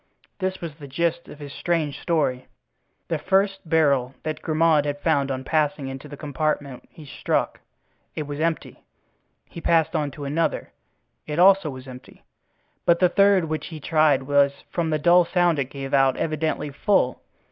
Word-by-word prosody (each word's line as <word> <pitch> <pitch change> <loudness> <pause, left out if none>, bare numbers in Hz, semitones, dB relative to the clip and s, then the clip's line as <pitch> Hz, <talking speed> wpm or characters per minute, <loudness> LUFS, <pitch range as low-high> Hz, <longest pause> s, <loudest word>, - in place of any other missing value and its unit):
This 185 -1 -3
was 165 -3 -5
the 145 - -9
gist 170 +4 -1
of - - -11
his 145 -1 -9
strange 165 -5 -1
story: 140 -7 -1 0.6
The 165 - -2
first 195 0 0
barrel 140 -5 +2
that 155 -1 -4
Grimaud 155 -1 +2
had 145 -1 -3
found 140 -4 +1
on 130 -1 -3
passing 145 -2 0
into 135 +2 -8
the 145 0 -10
compartment 145 -3 -3
he 155 - -14
struck—it 150 +2 -5
was 145 0 -6
empty. 165 0 -2 0.6
He 170 - -10
passed 165 0 +2
on 150 -2 0
to 140 +1 -8
another—it, 150 0 -5
also, 190 -2 +5
was 130 -1 -9
empty, 125 -1 -13 0.6
but 170 -1 +4
the 180 0 +3
third 195 -1 +4
which 155 0 -4
he 160 -2 -8
tried 150 -3 +2
was, 140 0 +2
from 170 -2 -1
the 155 - +1
dull 175 +4 +5
sound 175 -2 +1
it 135 - 0
gave 135 -1 -7
out, 135 -1 +3
evidently 155 -2 -2
full. 135 -3 +1
155 Hz, 165 wpm, -23 LUFS, 140-170 Hz, 0.6 s, also